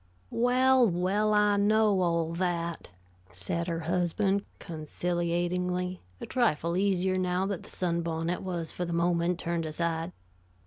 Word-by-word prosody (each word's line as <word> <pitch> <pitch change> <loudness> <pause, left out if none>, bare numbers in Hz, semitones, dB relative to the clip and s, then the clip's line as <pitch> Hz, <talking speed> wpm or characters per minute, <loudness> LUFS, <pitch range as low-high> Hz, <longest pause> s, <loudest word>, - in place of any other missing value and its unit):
"Well, 255 +1 +4
well, 190 +5 +1
I 210 -1 +4
know 210 -1 +3
all 170 -2 +1
that," 170 -1 -2 0.4
said 100 - -3
her 165 -1 -2
husband, 180 +4 0
conciliatingly, 175 +3 -2 0.2
a - - -5
trifle 170 - +1
easier 185 -1 +1
now 180 +1 0
that 195 -3 -3
the - - -12
sunbonnet 170 -1 -1
was 175 -4 -4
for 180 - -4
the 170 -1 -3
moment 170 +1 +1
turned 170 -2 -2
aside. 165 +2 -2
180 Hz, 130 wpm, -29 LUFS, 170-190 Hz, 0.4 s, Well